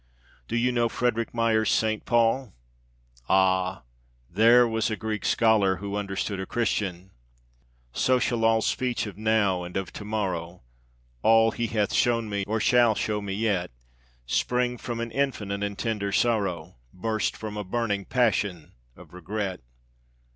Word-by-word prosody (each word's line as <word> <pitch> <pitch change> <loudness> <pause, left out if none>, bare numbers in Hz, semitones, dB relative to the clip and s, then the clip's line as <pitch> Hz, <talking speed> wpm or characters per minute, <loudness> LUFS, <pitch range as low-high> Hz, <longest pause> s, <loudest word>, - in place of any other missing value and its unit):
Do - - -3
you 120 +2 +2
know 120 -1 +1
Frederic 115 -2 -1
Myers's 115 -2 +2
Saint 110 -1 0
Paul? 120 0 +1 0.7
ah! 95 -1 +2 0.5
there 115 +6 +6
was 115 0 0
a 110 - -1
'Greek 110 -1 -4
scholar' 110 -4 +3
who 100 +2 -5
understood 100 0 -3
a 95 - -4
Christian! 95 -6 -2 0.8
So 130 0 +2
shall 120 -2 0
all 115 -1 +3
speech 125 -3 -1
of 105 - -7
now 105 -4 +1
and 90 +1 -5
of 95 - -4
to - - -7
morrow, 90 -6 -3 0.6
All 115 0 +5
he 120 +1 -2
hath 105 -2 -1
shown 115 -2 +2
me 100 -1 -1
or 110 +2 0
shall 120 -1 +4
show 105 0 -1
me 100 -1 -4
yet, 100 -4 0 0.6
Spring 125 - 0
from 120 -1 -5
an 115 0 -4
infinite 105 -8 -2
and 100 -1 -3
tender 105 -3 -2
sorrow, 100 - 0
Burst 110 +4 -2
from 110 -1 -6
a 105 - -3
burning 100 -1 -2
passion 100 -9 0 0.2
of - - -16
regret. 95 -1 -4
110 Hz, 150 wpm, -26 LUFS, 95-115 Hz, 0.8 s, there